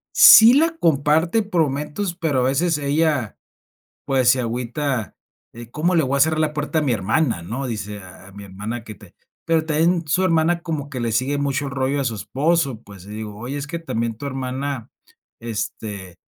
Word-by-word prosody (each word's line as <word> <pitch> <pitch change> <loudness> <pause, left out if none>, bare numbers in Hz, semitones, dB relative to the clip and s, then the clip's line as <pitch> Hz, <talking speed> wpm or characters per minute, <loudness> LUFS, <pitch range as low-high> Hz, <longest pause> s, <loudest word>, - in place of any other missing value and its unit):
Sí 225 +2 +9
la 325 +4 +3
comparte 160 - +2
por 190 -5 0
momentos, 150 +6 -2
pero 160 -6 0
a - - +1
veces 145 +6 +1
ella, 145 -4 0 0.7
pues, 130 -2 +2
se 130 - +3
agüita, 125 +1 -3 0.4
eh, 115 0 -11
¿cómo 165 +7 0
le 165 - +4
voy 135 +1 -1
a - - 0
cerrar 155 +2 +3
la 155 -1 +1
puerta 150 +2 -2
a - - +1
mi 140 -4 +1
hermana?, 110 - 0
¿no? 120 +10 -4
Dice 105 -3 -5
a 95 0 -13
a - - -16
mi 100 +1 -10
hermana 105 +5 -6
que 110 - -9
te - - -18 0.3
pero 165 -1 +2
también 165 +2 +1
su 165 +6 +1
hermana 170 -1 +2
como 155 -4 -5
que 130 -3 -5
le 120 -1 -1
sigue 130 +6 0
mucho 140 0 -1
el - - -5
rollo 135 +1 -1
a - - -1
su 115 -3 -1
esposo, 135 - -1
pues, 100 -2 -14
y - - -13
digo: 105 0 -6
"Oye, 125 +5 -5
es 145 0 -4
que 170 +3 -5
también 115 -8 -3
tu 140 - -7
hermana, 130 -1 -4 0.5
este, 105 -4 -6
140 Hz, 200 wpm, -21 LUFS, 115-160 Hz, 0.7 s, Sí